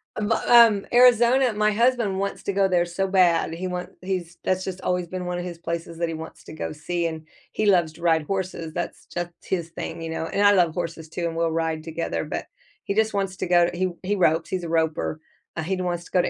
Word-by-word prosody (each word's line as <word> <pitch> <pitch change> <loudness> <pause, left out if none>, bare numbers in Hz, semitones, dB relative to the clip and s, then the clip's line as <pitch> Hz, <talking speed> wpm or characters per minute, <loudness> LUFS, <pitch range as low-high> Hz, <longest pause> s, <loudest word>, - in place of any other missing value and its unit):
A 215 - -3
but 220 +2 0
um, 230 -4 +7
Arizona 245 0 +5
my 210 0 +2
husband 230 -3 +2
wants 200 0 -3
to 200 - -2
go 195 0 +3
there 175 -2 +2
so 185 +3 -2
bad. 180 -4 +3
He 185 +2 -4
want 180 0 -4
he's 180 -2 -4
that's 185 0 0
just 190 -1 -5
always 180 -1 -1
been 185 +1 -5
one 180 0 -2
of - - -4
his 170 -2 -6
places 170 0 -5
that 170 - +1
he 165 - -4
wants 160 0 -9
to - - -10
go 155 - -4
see, 170 +3 -3
and 160 -1 -7 0.2
he 215 - -1
loves 175 -5 +3
to 170 - -15
ride 165 -2 +3
horses, 180 -3 -4
that's 175 - -5
just 175 0 -4
his 170 -3 -2
thing, 165 0 -6
you 165 - -4
know, 160 0 -3
and 205 +1 +1
I 205 - +8
love 175 -4 +3
horses 165 -2 -5
too, 170 +1 -3
and 165 - -5
we'll 165 0 +1
ride 160 -1 -1
together, 165 +1 -3
but - - -4 0.4
he 200 - -1
just 220 0 +2
wants 195 -2 -2
to 185 - -3
go 175 -1 +4
he 185 +1 -1
he 205 +3 0
ropes, 165 -4 +2
he's 185 -2 -2
a 170 - -4
roper. 160 -1 0 0.4
Uh, 160 - -3
he 190 +4 -1
wants 175 -1 -2
to - - -16
go 180 - +4
to - - -1
180 Hz, 250 wpm, -24 LUFS, 165-195 Hz, 0.4 s, I